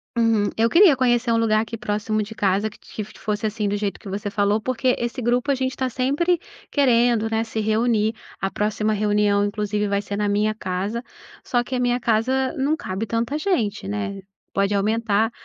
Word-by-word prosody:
Uhum. 225 -3 +2
Eu 225 +1 +4
queria 340 - +7
conhecer 240 -2 +2
um 230 - +3
lugar 215 -1 +3
aqui 225 +1 -5
próximo 215 0 -1
de 215 +2 -8
casa 200 +2 +1
que - - -17
que 215 - -7 0.2
fosse 210 +1 -2
assim 215 -1 -1
do 205 - 0
jeito 205 -1 -3
que 205 - -9
você 200 +1 -3
falou, 205 +1 +2
porque 255 +2 +1
esse 240 +1 -3
grupo, 245 +4 +1
a - - +2
gente 260 0 -2
tá 260 -1 0
sempre 285 +8 +1 0.3
querendo, 240 -5 +3
né, 225 0 0
se 225 -1 -4
reunir. 220 0 +1 0.3
A 195 - 0
próxima 215 +1 0
reunião 205 -1 +2
inclusive 210 0 -1
vai 200 0 0
ser 200 0 -5
na 210 0 0
minha 210 +1 +1
casa, 200 +4 -3 0.4
só 245 -2 +1
que 255 - -4
a - - 0
minha 245 0 +1
casa 250 +3 +1
não 280 +3 +1
cabe 195 -6 -4
tanta 230 +6 -1
gente, 220 - -1
né, 200 -1 -3 0.3
pode 200 +1 +1
aumentar, 220 +1 +1
220 Hz, 200 wpm, -23 LUFS, 205-240 Hz, 0.4 s, queria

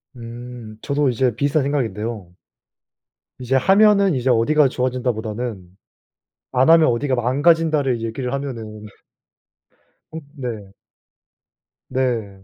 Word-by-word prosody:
음 120 -2 -9
저도 140 -1 0
이제 125 -1 0
비슷한 145 +4 +1
생각인데요. 110 -8 -3 1.0
이제 130 +1 -1
하면은 195 +4 +4
이제 130 0 -1
어디가 135 +5 +3
좋아진다 125 -1 -1
보다는 110 -3 -5 0.9
안하면 155 +5 +5
어디가 130 +3 0
망가진다를 140 0 +2
얘기를 125 +3 -4
하면은... 115 -6 -6 1.3
어 160 - -6 0.2
네. 115 -8 -6 1.2
네. 115 -7 -2
125 Hz, 240 characters per minute, -20 LUFS, 115-140 Hz, 1.3 s, 안하면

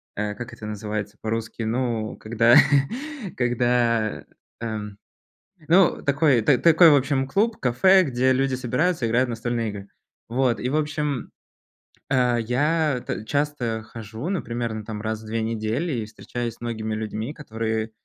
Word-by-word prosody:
э, 105 0 -2
как 120 +1 -8
это 110 - -9
называется 105 0 -4
по-русски, 115 +1 -3
ну, 115 -1 -1
когда 115 +2 +3 0.8
когда, 120 -2 +1 0.4
эм, 105 -3 -5 0.7
ну, 175 +2 +4
такой 140 -3 +3
т 130 +4 +4
такой, 165 0 +7
в 145 - +6
общем, 135 -1 +1
клуб, 215 +9 +1
кафе, 185 +10 +5
где 130 -2 +1
люди 135 0 +1
собираются, 130 +3 0
играют 120 +3 +2
в - - -4
настольные 115 -1 -2
игры. 100 -1 -8 0.4
Вот, 125 0 +1
и, 125 - -1
в 140 - -1
общем, 150 -3 -2 0.8
э, 125 -2 +2
я 145 +3 +1
т 110 - -4
часто 135 -4 -1
хожу, 110 - -7
ну, 190 -2 -1
примерно, 115 -2 -4
там, 105 -2 -6
раз 110 0 -3
в - - -12
2 115 +1 -2
недели, 115 +8 -2
и 115 -4 -2
встречаюсь 120 +2 -5
с - - -30
многими 110 -2 -3
людьми, 110 +4 -4
которые, 110 -5 -3
120 Hz, 155 wpm, -24 LUFS, 110-135 Hz, 0.8 s, такой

